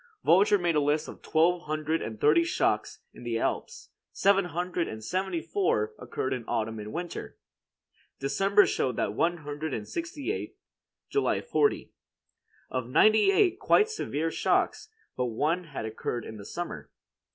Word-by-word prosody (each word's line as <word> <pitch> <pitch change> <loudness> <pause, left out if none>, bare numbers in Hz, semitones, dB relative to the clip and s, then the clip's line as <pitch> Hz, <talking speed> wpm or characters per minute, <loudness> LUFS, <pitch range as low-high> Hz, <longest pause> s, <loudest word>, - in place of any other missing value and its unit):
Volger 200 +3 +5
made 175 -1 +1
a - - +4
list 150 +2 +1
of - - -10
twelve 170 +2 +2
hundred 155 +1 -1
and 110 -1 -6
thirty 155 +6 +5
shocks 165 - 0
in - - -13
the 120 -1 -2
Alps; - - -3 0.2
seven 195 -1 +3
hundred 175 0 -2
and 110 0 -7
seventy 185 - -2
four 155 - 0
occurred 125 +1 -3
in 125 -2 -4
autumn 110 0 -2
and 105 0 -7
winter. 175 +1 -6 0.8
December 195 +9 +3
showed 125 -3 -1
one 165 +12 0
hundred 150 -1 -4
and 105 -2 -6
sixty 335 0 -4
eight; 440 - -5 0.5
July 420 - +1
forty. 435 -3 0 0.8
Of 130 -2 -2
ninety 215 - +5
eight 385 -2 +3
quite 435 +1 +4
severe 165 - -2
shocks, - - 0 0.3
but 125 - 0
one 155 +10 0
had 145 -8 -6
occurred 110 +1 -4
in 110 - -8
the 100 - -10
summer. 175 0 -6
165 Hz, 155 wpm, -28 LUFS, 125-190 Hz, 0.8 s, Volger